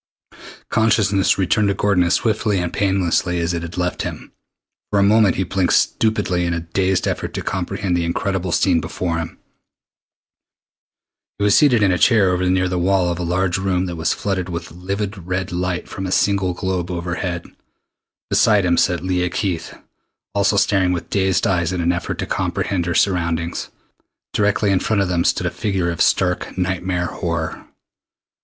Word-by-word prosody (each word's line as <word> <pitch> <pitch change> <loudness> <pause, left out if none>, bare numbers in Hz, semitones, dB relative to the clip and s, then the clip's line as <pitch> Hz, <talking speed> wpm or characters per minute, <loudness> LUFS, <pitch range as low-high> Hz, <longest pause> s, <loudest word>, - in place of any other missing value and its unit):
Consciousness 105 -3 +2
returned 100 +3 +2
to 100 - +1
Gordon 100 -3 +2
as 85 - +2
swiftly 110 -3 0
and 90 -1 -3
painlessly 95 -3 +1
as 85 +1 -1
it 85 - -2
had 85 +1 -7
left 90 0 -1
him. - - -6 0.6
For 105 - 0
a 100 - +4
moment 105 -2 +4
he 95 - 0
blinked 95 0 0
stupidly 105 -5 +1
in 85 0 -1
a - - -1
dazed 95 +3 0
effort - - -3
to - - -3
comprehend 95 -3 -2
the 85 - 0
incredible 90 +2 -2
scene 85 -1 +2
before 85 +2 -3
him. 80 0 -6 2.0
He 100 - -2
was 105 0 +4
seated 125 -8 +4
in 95 - +4
a 90 - 0
chair 95 +2 +4
over 90 0 0
near 90 0 +2
the 90 0 -1
wall 90 -1 +2
of 85 - -4
a - - -2
large 90 +1 0
room 95 -1 0
that 90 -2 -5
was 80 -1 0
flooded 95 -2 -2
with 85 -1 -5
livid 95 +1 -5
red 90 0 -2
light 90 0 -2
from 95 -1 -5
a - - -4
single 95 -2 +1
globe 95 -2 -2
overhead. 90 0 -3 0.9
Beside 105 -4 +4
him 85 -1 +2
sat 90 -2 +1
Leah 90 -1 0
Keith, 85 -5 -3 0.6
also 100 0 +2
staring 95 -3 +2
with 85 - -5
dazed 95 -2 +1
eyes 85 -3 +1
in 90 - -2
an 85 0 +2
effort 90 0 -3
to - - -3
comprehend 90 -3 -2
her 85 - -1
surroundings. 85 -3 0 0.6
Directly 105 0 +2
in 95 - +3
front 100 -1 +1
of 95 - -3
them 85 -1 +1
stood - - +1
a - - 0
figure 95 -5 -1
of 85 - -4
stark 90 -1 +1
nightmare 90 -1 -1
horror. 85 -2 -4
90 Hz, 180 wpm, -20 LUFS, 85-100 Hz, 2.0 s, a